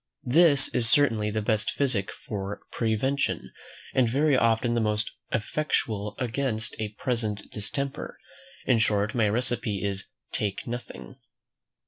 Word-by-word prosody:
This 145 +1 +7
is 115 -2 +5
certainly 115 -7 +3
the 110 0 -2
best 110 -1 +1
physic 125 -9 +1
for 100 0 -6
prevention, 120 +5 -1 0.4
and 125 -3 +3
very 145 +4 +2
often 115 0 +2
the 120 - +1
most 105 0 -1 0.2
effectual 105 -4 -1
against 120 -2 -1
a 105 -1 -4
present 110 -5 -2
distemper. 135 +7 -4 0.5
In 120 - +3
short, 105 -1 +1
my 115 -4 +2
recipe 115 -3 -1
is 100 -1 -2 0.2
"Take 100 -2 -3
nothing." 120 +1 -7
115 Hz, 125 wpm, -26 LUFS, 105-125 Hz, 0.5 s, This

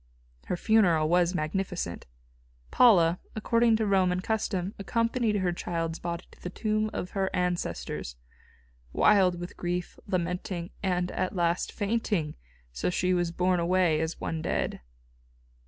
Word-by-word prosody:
Her 180 - -1
funeral 175 -8 +3
was 175 +1 +3
magnificent. 165 - -3 0.6
Paula, 180 -8 +5 0.2
according 230 +1 +3
to 220 0 0
Roman 185 -3 +2
custom, 200 -2 -2
accompanied 230 +2 0
her 185 -3 +1
child's 165 -1 -3
body 170 0 -4
to - - -19
the 180 - -5
tomb 215 +2 -1
of 180 - -5
her 195 -1 0
ancestors, 175 - -2 0.8
wild 185 -4 +4
with 175 0 -7
grief, 175 0 -3
lamenting, 180 -1 -2
and, 180 -2 0
at 185 - -2
last, 170 0 0
fainting, 205 -7 -1 0.4
so - - -2
that 180 - 0
she 185 +1 +1
was 175 -1 +1
borne 180 +1 +1
away 170 -2 +2
as 160 +1 -3
one 160 -1 -3
dead. - - -2
180 Hz, 140 wpm, -28 LUFS, 170-200 Hz, 0.8 s, Paula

